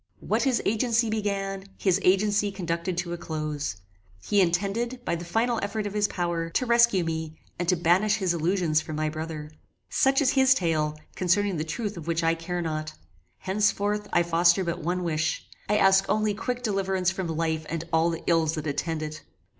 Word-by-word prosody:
What - - 0
his 260 -3 +1
agency 225 +1 +1
began, 195 -2 -2
his 190 -1 +2
agency 205 +2 +3
conducted 175 -1 -3
to 175 -1 -2
a 175 - -5
close. 155 - -3 0.4
He 200 - +2
intended, 200 +8 0
by - - 0
the 170 - -6
final 225 +6 0
effort 210 +1 -2
of 205 - -4
his 210 -1 +2
power, 170 -3 -2
to 255 - 0
rescue 235 -6 +4
me 160 -1 -4 0.2
and 175 -1 -1
to 180 - +4
banish 180 +5 +3
his 190 -5 0
illusions 170 -1 +1
from 155 - -6
my 155 0 0
brother. 155 -1 -6 0.4
Such 270 0 +3
is 270 -3 +3
his 265 -2 +5
tale, 155 -6 0 0.2
concerning 190 +1 +1
the 155 - -1
truth 200 +6 -4
of 165 -1 -8
which 170 0 0
I 165 0 +3
care 175 +1 -3
not. 155 -1 -3 0.4
Henceforth 205 +1 0
I 175 - +3
foster 170 +2 +3
but 170 -2 -3
one 180 +3 -2
wish 160 -1 -1 0.2
I 210 - +3
ask 195 -1 +5
only 215 -1 +2
quick 245 +4 -3
deliverance 190 -4 0
from 190 -2 -4
life 160 -1 -1
and 165 0 -3
all 165 +1 +4
the 165 -1 -4
ills 165 -1 +2
that 155 -1 -4
attend 155 +2 -2
it. 155 0 -6
180 Hz, 190 wpm, -26 LUFS, 165-205 Hz, 0.4 s, his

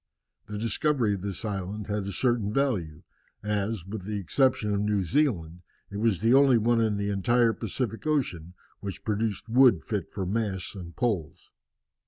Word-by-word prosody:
The 105 - -5
discovery 115 +1 +1
of 100 - -4
this 100 +3 -4
island 100 0 -4
had 105 -1 -2
a - - -3
certain 115 0 0
value, 105 - -1 0.4
as, 105 -2 -1
with 100 0 -6
the 105 +2 -3
exception 105 +2 +1
of 100 - 0
New 105 -2 +1
Zealand, 90 - 0 0.3
it 100 - -5
was 105 -3 +1
the 115 +2 +4
only 135 -2 +6
one 115 +1 +2
in 110 -2 +1
the 100 0 -1
entire 115 +4 +3
Pacific 115 +4 -4
Ocean 90 - -1 0.2
which 100 -2 -6
produced 105 -1 -2
wood 120 -6 +5
fit 100 -6 -3
for 95 - -4
masts 100 -1 -2
and 90 -4 -9
poles. 105 - -2
105 Hz, 170 wpm, -27 LUFS, 95-115 Hz, 0.4 s, only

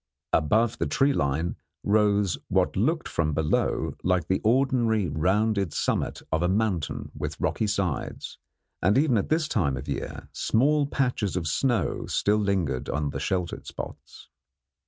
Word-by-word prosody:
Above 110 +9 +2
the - - 0
tree 140 +1 +2
line 75 - 0 0.3
rose 105 -2 +3
what - - +1
looked 160 - +1
from 75 -3 -1
below 80 -1 0
like 90 -3 +1
the 95 - +1
ordinary 115 -4 +2
rounded 95 +5 +1
summit - - -1
of 80 - +1
a 90 - +2
mountain 95 -5 -1
with - - -5
rocky 110 - 0
sides, 95 -7 -3 0.4
and 95 +7 +3
even 140 -3 +3
at 100 - 0
this 155 0 +2
time 70 - 0
of - - -7
year - - -5
small 145 +5 +2
patches 125 -9 -1
of 90 -3 -1
snow 120 - 0
still 105 +1 +2
lingered 95 -11 -1
in 75 -1 -1
the - - -4
sheltered 90 -2 -2
spots. - - -9
100 Hz, 150 wpm, -26 LUFS, 85-115 Hz, 0.4 s, rose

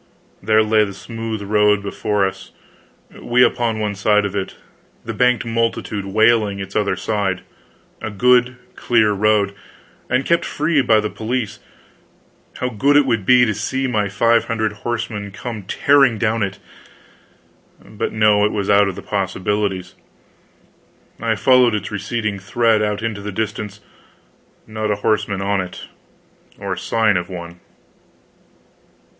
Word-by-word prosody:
There 110 0 +3
lay 110 0 +3
the 100 -2 -5
smooth 115 0 -6
road 105 0 +2
below 100 0 0
us, 95 - -8 0.7
we 125 +1 +3
upon 120 -3 +1
one 105 -1 -1
side 105 +1 +2
of 100 0 -4
it, 95 -2 -3 0.5
the - - -4
banked 125 -1 +2
multitude 115 -3 -2
wailing 110 0 +2
its 95 0 -7
other 105 -1 +1
side 100 -4 -2 0.6
a 110 - -4
good 125 +4 +3 0.2
clear 110 -3 +2
road, 105 0 +2 0.6
and 130 +2 +1
kept 170 0 +2
free 150 -1 +1
by 110 -3 +3
the 105 - -3
police 115 0 -3 1.0
how 125 - -2
good 140 +5 +3
it 145 - +4
would 115 -7 -1
be 125 -1 +6
to 110 - 0
see 130 +6 -2
my 105 -5 0
five 115 +4 +2
hundred 110 -2 -1
horsemen 110 -2 -4
come 110 +2 -7
tearing 135 -1 +3
down 110 +1 0
it! 95 -2 -2 1.2
But 105 - -5
no, 105 -1 +3
it 105 - +2
was 100 -1 -1
out 100 0 +5
of 95 - -4
the - - -9
possibilities. 95 -1 -2 1.3
I - - 0
followed 125 -3 +4
its 105 0 -4
receding 105 0 -3
thread 110 +2 +1
out 105 0 -1
into 110 -3 -3
the 105 +1 -5
distance 105 0 -4 0.8
not 110 0 -4
a 105 - +1
horseman 100 -2 0
on 100 -1 0
it, 90 -1 -8 0.8
or 100 -2 -4
sign 110 +2 +1
of 90 +1 -4
one. 85 -1 -8
105 Hz, 145 wpm, -19 LUFS, 100-115 Hz, 1.3 s, be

